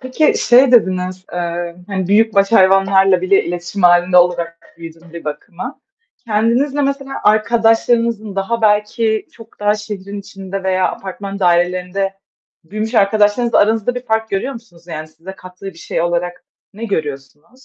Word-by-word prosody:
Peki 260 Hz, +4 st, +1 dB
şey 250 Hz, +1 st, +5 dB
dediniz, 185 Hz, -4 st, +1 dB
eee, 175 Hz, 0 st, -4 dB
hani 190 Hz, -3 st, -3 dB
büyük 220 Hz, +2 st, +3 dB
baş 200 Hz, +1 st, +2 dB
hayvanlarla 195 Hz, -2 st, +4 dB
bile 185 Hz, +2 st, +2 dB
iletişim 175 Hz, +3 st, -5 dB
hâlinde 175 Hz, +1 st, +4 dB
olarak 175 Hz, -1 st, +1 dB
büyüdüm 165 Hz, 0 st, -12 dB
bir 170 Hz, -, -9 dB
bakıma. 170 Hz, -, -7 dB, 0.5 s
Kendinizle 235 Hz, +7 st, +1 dB
mesela 275 Hz, 0 st, -2 dB
arkadaşlarınızın 225 Hz, 0 st, +2 dB
daha 225 Hz, +4 st, -2 dB
belki 215 Hz, +1 st, +1 dB
çok 225 Hz, -2 st, -17 dB
daha 205 Hz, 0 st, +2 dB
şehrin 205 Hz, -1 st, -7 dB
içinde 195 Hz, 0 st, -7 dB
veya 185 Hz, -1 st, +1 dB
apartman 195 Hz, +1 st, -7 dB
dairelerinde 180 Hz, +2 st, 0 dB, 0.5 s
büyümüş 215 Hz, +7 st, -5 dB
arkadaşlarınızla 215 Hz, +3 st, +3 dB
aranızda 220 Hz, +3 st, +2 dB
bir 250 Hz, 0 st, -6 dB
fark 220 Hz, 0 st, -1 dB
görüyor 200 Hz, +8 st, -2 dB
musunuz? 180 Hz, -8 st, -14 dB
Yani 155 Hz, -2 st, -7 dB
size 165 Hz, +4 st, -11 dB
kattığı 185 Hz, 0 st, -13 dB
bir 185 Hz, -4 st, -8 dB
şey 165 Hz, -, -3 dB
olarak 175 Hz, +1 st, -2 dB, 0.3 s
ne 220 Hz, +3 st, -7 dB
görüyorsunuz? 155 Hz, -, -6 dB
195 Hz, 145 wpm, -17 LUFS, 175-225 Hz, 0.5 s, şey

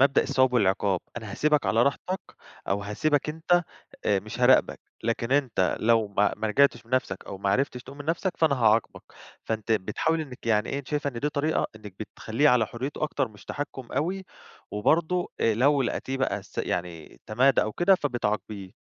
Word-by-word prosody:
مبدأ 140 Hz, 0 st, +5 dB
الثواب 130 Hz, -2 st, +2 dB
والعقاب، 95 Hz, -4 st, +2 dB, 0.2 s
أنا 110 Hz, -3 st, -6 dB
هاسيبك 150 Hz, -3 st, +2 dB
على 110 Hz, +5 st, +3 dB
راحتك 180 Hz, +7 st, -1 dB, 0.5 s
أو 100 Hz, +1 st, 0 dB
هاسيبك 145 Hz, +9 st, 0 dB
أنت 175 Hz, +3 st, +2 dB, 0.4 s
آآ -, -, +2 dB
مش -, -, -8 dB
هاراقبك، -, -, +4 dB, 0.2 s
لكن 115 Hz, +2 st, -1 dB
أنت 130 Hz, -10 st, +1 dB
لو 115 Hz, -1 st, +3 dB
ما 100 Hz, 0 st, +2 dB
ما 110 Hz, -, -2 dB
رجعتش 120 Hz, +1 st, +3 dB
بنَفسك 115 Hz, -5 st, -2 dB
أو 95 Hz, -, -7 dB
ما 100 Hz, 0 st, 0 dB
عرفتش 125 Hz, +2 st, 0 dB
تقوم 140 Hz, +2 st, -12 dB
من 145 Hz, -, -7 dB
نَفسك 170 Hz, +3 st, -1 dB
فأنا 155 Hz, -4 st, +3 dB
هاعاقبك، 115 Hz, -2 st, +2 dB, 0.4 s
فأنتِ 110 Hz, 0 st, -2 dB
بتحاولي 160 Hz, +10 st, 0 dB
إنِك 130 Hz, -5 st, -11 dB
يعني 105 Hz, -1 st, +2 dB
إيه 140 Hz, -, -2 dB
أنتِ 135 Hz, -, -9 dB
شايفة 150 Hz, -1 st, -1 dB
إن 120 Hz, -, -7 dB
دي 150 Hz, -, +1 dB
طريقة 150 Hz, +2 st, 0 dB
إنِك 105 Hz, -3 st, -11 dB
بتخليه 115 Hz, +6 st, 0 dB
على 125 Hz, -3 st, +4 dB
حريته 130 Hz, +8 st, -5 dB
أكتر 150 Hz, -4 st, 0 dB
مش 105 Hz, -2 st, -17 dB
تحكّم 135 Hz, -4 st, -6 dB
أوي، 180 Hz, +8 st, -1 dB, 0.5 s
وبرضو 165 Hz, +11 st, +1 dB
آآ، 115 Hz, -2 st, +3 dB
لو 140 Hz, +4 st, +3 dB
لقيتيه 130 Hz, +2 st, -2 dB
بقى 135 Hz, -, -1 dB
س -, -, -12 dB
يعني 85 Hz, -3 st, -4 dB
تمادى 125 Hz, +4 st, +3 dB
أو 110 Hz, -, -3 dB
كده 185 Hz, -, +4 dB
فبتعاقبيه. 105 Hz, -, -3 dB
125 Hz, 180 wpm, -26 LUFS, 105-145 Hz, 0.5 s, مبدأ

